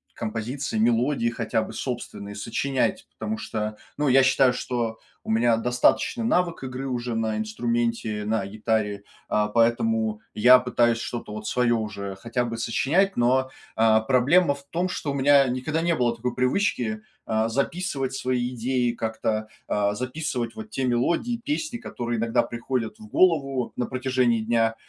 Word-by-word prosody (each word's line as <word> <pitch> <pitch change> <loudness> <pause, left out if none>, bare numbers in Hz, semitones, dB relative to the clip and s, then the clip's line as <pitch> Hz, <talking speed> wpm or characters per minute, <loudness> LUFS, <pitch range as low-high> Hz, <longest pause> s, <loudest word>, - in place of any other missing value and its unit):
композиции, 115 +4 -3
мелодии, 120 +3 +2
хотя 115 -1 -1
бы - - -6
собственные, 105 -5 -5
сочинять, 125 +6 -1
потому 110 0 -2
что, 105 0 -3 0.2
ну, 145 0 +1
я 135 0 +6
считаю, 130 -1 +4
что 120 -3 -2 0.3
у - - -7
меня 115 +1 +3
достаточный 125 - +2
навык 180 -9 +1
игры 130 +1 -5
уже 120 -2 -2
на 110 -1 0
инструменте, 115 0 -1
на 105 -1 0
гитаре, 105 -1 -1 0.2
а, 105 0 +1
поэтому 115 -1 +1
я 125 +4 +7
пытаюсь 120 -2 +2
что-то 115 -3 -5
вот 105 0 -6
свое 125 +1 +2
уже 105 -3 -3
хотя 120 +4 -2
бы 115 -1 -4
сочинять, 145 - +1
но, 130 +2 +2 0.3
а, 110 0 +5
проблема 140 +7 +3
в 140 - -14
том, 175 +2 0
что 155 -5 -3
у - - -3
меня 140 0 +5
никогда 140 +6 -1
не 170 0 +2
было 120 -3 +1
такой 120 +1 -3
привычки, 125 - 0 0.2
а, 110 0 0
записывать 140 +1 -1
свои 125 -1 -1
идеи 125 0 0
как-то, 110 -1 -2 0.2
а, 105 0 +1
записывать 125 -1 -3
вот 220 0 -8
те 135 -11 -2
мелодии, 170 - 0
песни, 300 -1 -2
которые 120 - -4
иногда 115 +1 +2
приходят 115 -2 -3
в 110 - -11
голову 135 -6 +2
на 125 - -1
протяжении 130 -2 +1
дня, 115 0 +1
120 Hz, 155 wpm, -25 LUFS, 110-130 Hz, 0.3 s, я